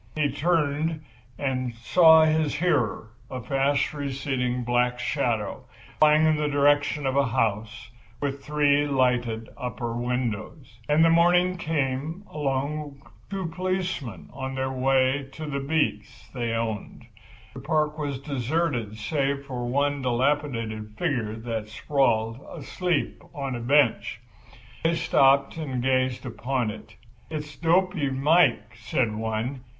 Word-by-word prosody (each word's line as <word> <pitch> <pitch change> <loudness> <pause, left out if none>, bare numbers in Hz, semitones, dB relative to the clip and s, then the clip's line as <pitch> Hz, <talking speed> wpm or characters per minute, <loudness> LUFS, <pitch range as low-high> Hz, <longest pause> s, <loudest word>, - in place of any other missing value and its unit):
He 150 -2 +1
turned 155 -1 0 0.3
and 130 -3 -2
saw 160 +6 +6
his 155 -1 +1
hearer, 120 -10 0 0.2
a 130 - -5
fast 135 +4 0
receding 135 -3 -2
black 125 +1 +1
shadow, 120 -5 -2 0.3
flying 155 +1 +6
in 155 -1 +3
the 150 0 0
direction 145 0 +2
of 135 0 0
a 140 -1 +3
house 110 -2 -2 0.3
with 140 -1 -3
three 145 -1 +2
lighted 125 -4 +1
upper 120 -2 -4
windows. 120 +1 -3
And 150 - +3
in 160 - +5
the 165 - +5
morning 175 +2 +4
came 155 +1 -2
along 145 0 -2 0.3
two 195 -2 -3
policemen 180 - -3
on 135 0 -5
their 130 0 -1
way 130 +1 +2
to 155 - -6
the 140 -2 -3
beats 140 -4 -2
they 120 -3 -2
owned. 115 0 -4 0.5
The 130 - -8
park 155 +1 0
was 145 -3 -2
deserted 135 -4 -2
save 140 +4 -1
for 125 -3 -4
one 140 +2 0
dilapidated 120 -5 -1
figure 125 -11 -1
that 110 -1 -4
sprawled, 115 -1 0
asleep, 175 +3 -2
on 135 -2 -3
a - - -4
bench. 125 -3 +2 0.6
They 165 +1 +2
stopped 140 -2 +3
and 135 -6 -3
gazed 130 -1 +1
upon 120 0 -2
it. - - -12 0.3
"It's 150 -1 -6
Dopy 175 -3 +2
Mike," 135 -5 +2
said 115 0 -1
one. 110 +4 -3
135 Hz, 130 wpm, -26 LUFS, 120-150 Hz, 0.6 s, saw